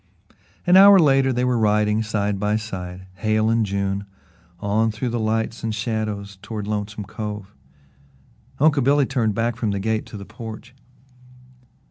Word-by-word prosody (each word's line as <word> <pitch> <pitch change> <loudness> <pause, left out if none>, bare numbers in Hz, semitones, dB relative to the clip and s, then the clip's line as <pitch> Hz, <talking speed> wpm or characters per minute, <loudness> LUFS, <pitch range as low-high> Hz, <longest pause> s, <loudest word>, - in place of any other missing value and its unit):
An 180 +1 +6
hour 200 +1 +9
later 135 -5 +4
they 125 0 0
were 125 -2 +1
riding 105 0 +2
side 105 -2 -1
by 105 +1 0
side 95 -4 -6
Hale 110 +2 +1
and 115 0 +2
June 100 0 -2 0.5
on 110 +3 +1
through 110 +3 -3
the 120 0 -2
lights 110 +2 -1
and 110 -1 -2
shadows 105 -3 -3
toward 105 0 -5
Lonesome 105 0 -4
Cove. 105 -1 -6 1.0
Uncle 145 0 +3
Billy 140 +2 +3
turned 115 -6 0
back 115 +1 0
from 115 -2 -1
the 100 -1 -1
gate 110 +2 -1
to - - -9
the 100 - -9
porch. 110 +2 -9
110 Hz, 155 wpm, -22 LUFS, 105-120 Hz, 1.0 s, hour